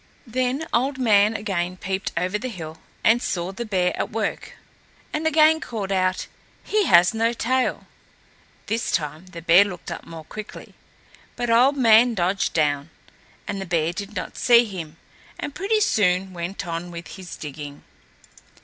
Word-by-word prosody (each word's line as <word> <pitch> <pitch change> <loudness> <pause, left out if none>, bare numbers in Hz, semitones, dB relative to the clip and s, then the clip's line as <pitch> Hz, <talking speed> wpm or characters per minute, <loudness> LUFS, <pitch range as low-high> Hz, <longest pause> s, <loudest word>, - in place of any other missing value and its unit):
Then 255 +5 -1
Old 260 +3 +1
Man 215 -3 +4
again 185 -4 -2
peeped 190 +1 -3
over 185 +4 0
the 255 - -4
hill 160 -7 -8 0.2
and 230 +2 +4
saw 175 -4 -2
the 235 +5 -5
bear 185 -4 0
at - - -2
work, 215 -2 -3 0.6
and 315 +1 0
again 315 0 +5
called 205 -5 -4
out, 185 -1 +1 0.4
"He 425 -1 +1
has 175 +1 +6
no 225 +1 +1
tail." 255 +2 0 0.8
This 225 +2 -1
time 155 +2 -2
the 170 -2 -10
bear 175 +3 +7
looked 180 -4 -7
up - - -6
more 165 -1 -10
quickly, 215 +5 -9 0.6
but 240 -1 -1
Old 255 +5 +5
Man 230 -1 +5
dodged 190 +2 0
down, 145 -1 +1 0.6
and 200 -1 -3
the - - -4
bear 165 -1 0
did 200 +3 -7
not 185 - -5
see 240 -1 +6
him, 165 -7 -7 0.4
and 290 - -4
pretty 410 +6 +1
soon 190 - +2
went 180 +3 -5
on 170 +1 -4
with 170 -1 -8
his 185 -3 -9
digging. 145 -1 -8
195 Hz, 160 wpm, -23 LUFS, 175-235 Hz, 0.8 s, bear